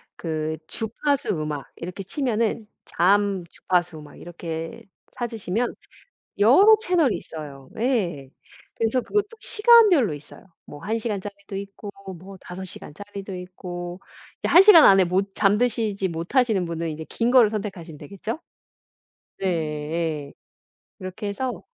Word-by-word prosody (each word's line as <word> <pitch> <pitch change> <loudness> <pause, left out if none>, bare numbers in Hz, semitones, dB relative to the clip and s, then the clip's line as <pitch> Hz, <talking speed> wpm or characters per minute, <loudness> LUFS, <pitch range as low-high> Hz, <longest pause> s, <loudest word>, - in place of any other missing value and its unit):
그 155 -1 -3
주파수 260 +6 -2
음악 150 -2 -4
이렇게 180 +3 -7
치면은 225 -1 -1 0.2
잠, 195 +1 +2
주파수 175 -4 -1
막 150 -1 -14
이렇게 165 -1 -6 0.3
찾으시면 230 -1 -2 0.7
여러 330 - +7
채널이 340 - +2
있어요. 140 -4 -10
예. 185 - -1 0.5
그래서 230 +3 +1
그것도 415 - 0
시간별로 425 - +5
있어요. 145 0 -12 0.2
뭐 145 - -11
1 220 +3 -1
시간짜리도 200 -3 -5
있고 200 +1 -7 0.3
뭐 190 +3 -12
5 180 +2 -8
시간짜리도 195 +3 -8
있고. 180 -1 -7 0.4
이제 - - -2
1 355 - +8
시간 380 -6 +9
안에 195 -1 +7
못 190 +3 -1
잠드시지 210 -1 +1
못하시는 190 +4 +1
분은 165 0 -3
이제 155 +1 -6
긴 230 +1 0
걸 245 -4 +6
선택하시면 190 -7 -6
되겠죠? 200 - -6 1.0
예예. 155 -3 -2 0.7
그렇게 185 +3 -6
해서 250 +5 -4
195 Hz, 270 characters per minute, -24 LUFS, 170-230 Hz, 1.0 s, 시간